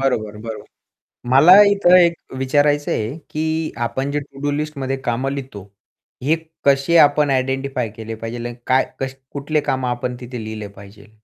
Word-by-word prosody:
बरोबर. 110 -6 -1
बरोबर. 110 -1 -7 0.7
मला 170 +10 +8
इथे 185 -3 +5
एक 170 - -1 0.2
विचारायचं 145 +2 +1
आहे, 110 +7 -2
की 160 +1 -2
आपण 135 +4 -3
जे 145 0 -1
टू-डू 140 +1 -5
लिस्टमध्ये 145 -2 -3
कामं 125 +3 -1
लिहितो, 130 -8 -7 0.6
हे 150 +5 +2 0.3
कसे 140 +4 +3
आपण 145 0 +4
आयडेंटिफाय 135 -2 -1
केले 115 0 -6
पाहिजे 115 +2 -6
आणि 120 - -6
काय 130 0 +3
कस 135 0 -3 0.2
कुठले 150 +2 -1
कामं 130 -3 -2
आपण 125 0 -3
तिथे 125 -2 -7
लिहिले 110 -1 -6
पाहिजे. 100 +2 -15
135 Hz, 155 wpm, -20 LUFS, 120-145 Hz, 0.7 s, मला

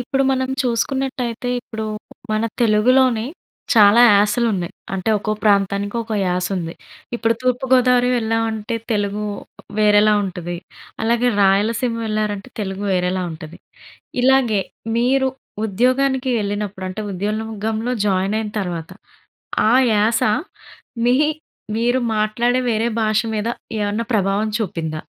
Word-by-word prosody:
ఇప్పుడు 270 +2 0
మనం 260 0 0
చూసుకున్నటయితే, 250 0 -2
ఇప్పుడు 220 -2 -6 0.5
మన 215 +1 +1 0.2
తెలుగులోనే, 235 +2 +3 0.5
చాలా 210 +1 +7
యాసలు 210 +4 +3
ఉన్నాయి. 175 -2 -3 0.2
అంటే, 190 +3 -1
ఒక్కో 215 +1 -2
ప్రాంతానికి 200 0 +2
ఒక్కో 225 -1 -3
యాస 180 0 0
ఉంది. 165 -2 -4 0.4
ఇప్పుడు 230 0 +1
తూర్పు 255 +1 0
గోదావరి 250 -1 +4
వెళ్ళామంటే, 225 0 -1 0.2
తెలుగు 205 0 -1 0.6
వేరేలా 210 0 +5
ఉంటది, 175 -2 -5 0.5
అలాగే 235 +2 +2
రాయలసీమ 215 +5 +2
వెళ్లారంటే, 215 +1 -2
తెలుగు 195 0 -4
వేరేలా 180 0 0
ఉంటది. 155 +1 -9 0.6
ఇలాగే, 255 -6 +3 0.4
మీరు 265 +3 +2 0.4
ఉద్యోగానికి 255 +5 +1
వెళ్ళినప్పుడు 205 -2 -3
అంటే, 190 +4 -5
ఉద్యోగంలో 220 +4 -2
జాయిన్ 195 +2 +1
అయిన 215 -1 -4
తర్వాత, 175 -3 -4 0.8
ఆ - - +4 0.2
యాస 215 +3 +2 0.8
మీ 245 - +4 0.6
మీరు 245 +2 +2 0.2
మాట్లాడే, 235 +4 +1
వేరే 225 +1 +1
భాష 215 0 +2 0.2
మీద 210 +2 -1 0.3
ఏమన్నా 205 +3 -1
ప్రభావం 200 +1 +1
చూపిందా? 160 -6 -3
215 Hz, 115 wpm, -20 LUFS, 200-240 Hz, 0.8 s, చాలా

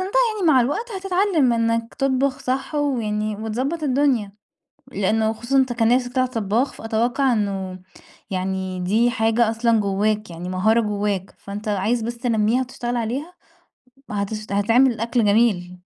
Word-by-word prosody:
يعني 440 -7 +2
مع 260 - +5
الوقت 290 - -1
هتتعلّم 375 -8 +1
إنك 230 0 0
تطبخ 270 0 0
صح 265 +4 -3
ويعني 215 -7 -1
وتضبّط 250 +10 -3
الدنيا، 260 -7 +1 0.6
لأنه 220 +3 +1
خصوصًا 240 +5 -1
أنت 260 -2 +2
كان 230 -1 +1
نِفسك 245 -1 -1
تطْلع 255 0 +2
طبّاخ، 235 +1 -1
فأتوقّع 240 +4 0
إنه 195 -4 -2 0.5
يعني 190 -1 -3
دي 215 +7 +2
حاجة 225 0 +2
أصلًا 225 0 +2
جوّاك، 210 +1 0
يعني 170 +1 -7
مهارة 215 +5 +2
جوّاك، 205 -2 -2
فأنت 205 +2 -8
عايز 210 +4 0
بس 235 +2 -4
تنمّيها 235 0 +1
وتشتغل 245 -1 -4
عليها 260 +9 -3 0.8
هتش 210 +1 -3
هتعمل 230 +4 +3
أكل 235 0 +1
جميل. 200 -4 +2
230 Hz, 140 wpm, -22 LUFS, 210-255 Hz, 0.8 s, مع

